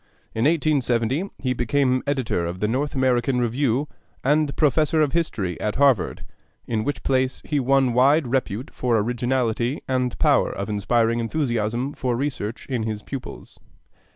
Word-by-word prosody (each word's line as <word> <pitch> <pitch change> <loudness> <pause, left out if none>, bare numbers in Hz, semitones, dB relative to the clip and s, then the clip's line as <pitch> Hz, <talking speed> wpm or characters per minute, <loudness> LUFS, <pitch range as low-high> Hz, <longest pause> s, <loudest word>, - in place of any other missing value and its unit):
In 110 +2 0
1870 145 - +1
he 130 -2 -1
became 130 +1 +1
editor 130 -10 0
of 85 +2 -5
the 105 - 0
North 135 +6 -1
American 130 -1 +2
Review 125 +3 0 0.4
and 150 +1 +2
Professor 155 +1 +2
of 150 -3 +2
History 105 - -1
at 105 - -1
Harvard, 135 -8 +2 0.4
in 110 -2 -1
which 140 -2 -3
place 130 -1 0
he 150 -2 0
won 135 -1 +2
wide 140 +5 +4
repute 125 -1 -2
for 120 -2 +1
originality 120 +2 -1
and 125 -2 -1
power - - +3
of 100 +2 -5
inspiring 115 +3 +1
enthusiasm 120 0 -1
for 125 -2 -1
research 125 -4 -3
in 125 -4 -2
his 110 -1 -4
pupils. 135 -2 -8
125 Hz, 150 wpm, -23 LUFS, 115-140 Hz, 0.4 s, wide